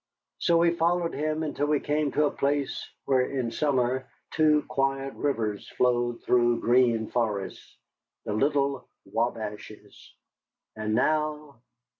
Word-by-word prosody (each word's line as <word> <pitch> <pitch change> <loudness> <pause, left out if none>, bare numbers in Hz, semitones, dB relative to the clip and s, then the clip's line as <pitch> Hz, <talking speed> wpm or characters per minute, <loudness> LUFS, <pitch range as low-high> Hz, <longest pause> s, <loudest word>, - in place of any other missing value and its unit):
So 170 -1 +3
we 170 0 +4
followed 170 0 0
him 155 +2 -1
until 145 -1 -1
we 150 -1 +2
came 150 0 0
to 150 - +3
a - - +1
place 140 0 -1 0.2
where, 130 -2 +3
in 125 -2 -2
summer, 130 -1 0 0.2
two 150 -1 +3
quiet 135 0 -1
rivers 110 -8 -2
flowed 120 -1 +1
through 120 -1 +3
green 120 -2 +3
forests 105 -5 -3 0.5
the 105 - -2
little 140 +2 0 0.2
Wabashes. 110 -2 -5 0.6
And 110 0 -2
now! 150 +1 0
135 Hz, 125 wpm, -27 LUFS, 120-150 Hz, 0.6 s, we